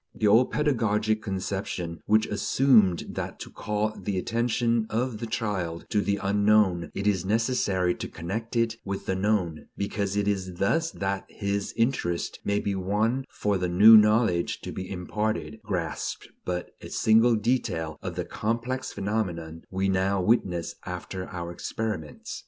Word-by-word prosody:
The - - -1
old 110 +5 +5
pedagogic 110 -7 +1
conception, 95 -4 -4
which 110 +1 +4
assumed 105 -4 +3
that - - -5
to - - -8
call 105 +1 -2
the 100 -2 -3
attention 115 +2 +1
of 115 0 -1
the 115 - -4
child 95 -8 -2
to 105 - +3
the 100 0 0
unknown 100 -4 +3
it 100 - -3
is 100 -4 +2
necessary 100 -4 +1
to - - -6
connect 110 +8 -5
it 115 -1 +1
with 100 0 -4
the - - 0
known, 95 -5 0
because 100 0 -2
it 100 0 +1
is 95 -3 -1
thus 165 - +1
that 95 -7 -3
his 100 0 -2
interest 115 -8 0
may 100 0 +1
be 100 - -1
won 105 +7 0
for 100 -2 -1
the 90 -1 -1
new 105 +6 +9
knowledge 105 -4 +4
to - - -6
be 95 0 -6
imparted, 110 +4 -3
grasped 90 -7 -3 0.2
but 90 -1 -3
a - - -8
single 115 +2 +4
detail 95 -9 -1
of - - -5
the - - -2
complex 120 +4 -2
phenomenon 85 -6 -3
we 95 +1 0
now 95 +1 +1
witness 90 -4 +1
after 95 -1 -5
our 85 -1 -5
experiments. 90 -3 -5
100 Hz, 155 wpm, -27 LUFS, 95-110 Hz, 0.2 s, new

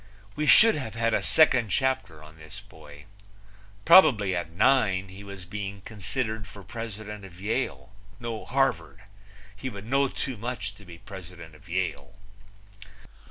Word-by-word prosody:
We 150 0 -1
should 225 +7 +7
have 120 -7 -5
had 115 0 0
a - - +2
second 125 -8 +4
chapter 130 - -1
on 75 +1 -15
this 80 -1 -11
boy. 75 0 -15 0.8
Probably 135 - +6
at 85 -2 -3
nine 95 -1 +2
he 95 +2 -11
was 100 -2 -10
being 100 +1 -6
considered 110 +1 -4
for 100 -1 -12
president 105 -1 -7
of 90 -2 -13
Yale 110 +2 -3 0.3
no, 115 -2 -5
Harvard. 135 -7 -1 0.5
He 115 +6 -5
would 100 -3 -9
know 135 +4 +2
too 130 -1 -4
much 105 -3 -4
to 100 0 -17
be 85 -2 -11
president 85 -3 -11
of 90 +4 -18
Yale. 95 +2 -3
105 Hz, 150 wpm, -27 LUFS, 95-125 Hz, 0.8 s, should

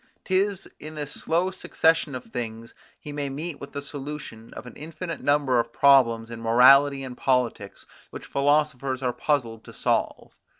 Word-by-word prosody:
'Tis 195 0 0
in 155 +1 -9
this 145 -1 -5
slow 175 +5 0
succession 165 -5 +1
of 125 - -6
things 115 -1 -6 0.3
he 150 - -9
may 145 -1 -3
meet 150 +2 -6
with 140 - -8
the 140 - -6
solution 140 -5 -8
of - - -8
an 125 - -11
infinite 165 +3 -7
number 140 -4 +2
of 115 0 -2
problems 120 -4 +4
in 115 -1 -7
morality 135 +4 +5
and 130 -1 -7
politics, 125 -6 -1 0.2
which - - -9
philosophers 140 -2 0
are 125 -1 0
puzzled 120 -7 -1
to - - -12
solve. - - -2
140 Hz, 165 wpm, -25 LUFS, 125-150 Hz, 0.3 s, morality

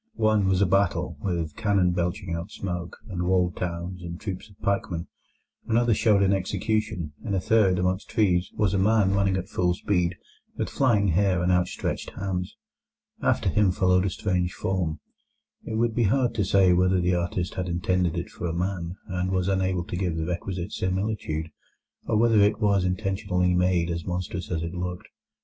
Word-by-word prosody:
One 110 - +2
was 95 +1 +3
a - - +4
battle, 95 +1 +1
with 85 -5 -2
cannon 100 -5 +2
belching 90 +1 -2
out 85 +4 -4
smoke, 90 -4 -5
and 90 -4 -4
walled 90 -1 +2
towns, 90 +1 -4
and 85 -1 -7
troops 95 0 -6
of 100 - -20
pikemen. 90 -4 -1 0.6
Another 115 +1 +3
showed 105 -2 +3
an 100 0 +3
execution. 100 -3 -1
In 100 -3 -2
a - - +2
third, 100 -2 +3
among 90 +1 +1
trees, 90 -6 +2
was 105 -4 +1
a 100 - +2
man 100 -1 +3
running 100 -1 +2
at 95 0 -4
full 90 -3 0
speed, 90 -2 0 0.4
with - - -2
flying 105 -7 +3
hair 90 0 +2
and 90 - +2
outstretched 90 0 -1
hands. 90 -2 -3 0.6
After - - +1
him 100 +1 +3
followed 90 0 +2
a - - +1
strange 90 -1 -1
form; 90 -5 -1 0.7
it 110 - -4
would 115 +1 +1
be 115 0 +2
hard 125 +4 +2
to 105 - 0
say 95 -1 +4
whether 90 +1 +3
the 90 +1 +1
artist 90 0 -1
had 90 -1 -3
intended 90 0 0
it 85 - -4
for 90 - -4
a 80 - -2
man, 90 -1 -2
and 90 0 -2
was 95 -1 0
unable 95 -2 +1
to 90 - -6
give 90 -3 -1
the 80 - -1
requisite 90 +1 -4
similitude, 95 -5 -2 0.6
or 110 - +2
whether 115 -1 +4
it 105 +1 +3
was 100 -3 +3
intentionally 90 -1 0
made 90 -1 +2
as 85 0 -3
monstrous 90 0 -4
as 85 -2 -2
it 85 +1 -4
looked. 90 0 -5
90 Hz, 185 wpm, -26 LUFS, 90-100 Hz, 0.7 s, a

